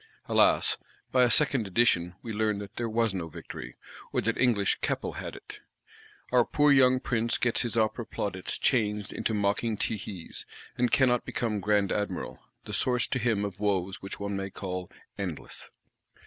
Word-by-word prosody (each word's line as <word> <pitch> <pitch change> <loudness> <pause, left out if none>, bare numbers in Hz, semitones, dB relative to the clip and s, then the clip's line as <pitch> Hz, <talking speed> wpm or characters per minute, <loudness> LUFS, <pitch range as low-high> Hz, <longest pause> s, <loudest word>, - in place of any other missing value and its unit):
Alas, - - +4 0.3
by 130 - +4
a 125 - +5
second 135 -6 +4
edition, 90 -4 +2
we 115 - -5
learn 105 -1 +1
that 100 -1 -8
there 120 -1 -2
was 115 -1 +1
no 90 -3 -3
victory; 80 - -9 0.4
or - - +1
that 115 +2 0
English 110 -6 +2
Keppel - - -1
had - - -6
it. - - -11 0.7
Our 125 -1 +5
poor 145 +4 +3
young 130 -2 +5
Prince 115 -3 0
gets 120 -1 +1
his 120 -2 -1
Opera 110 +1 0
plaudits 95 -3 -3
changed 105 -5 0
into 110 - -1
mocking 105 +2 0
tehees; 100 -5 -3 0.3
and 125 0 +1
cannot 125 -3 +3
become 110 -3 -2
Grand 100 0 +2
Admiral,—the 105 0 -5
source 125 -2 +1
to 130 - 0
him 110 -4 +1
of 95 -2 -6
woes 95 -2 -1
which 95 - -7
one 100 0 -3
may 95 0 -3
call 90 -2 -5 0.3
endless. 90 -6 -6
105 Hz, 165 wpm, -28 LUFS, 100-120 Hz, 0.7 s, a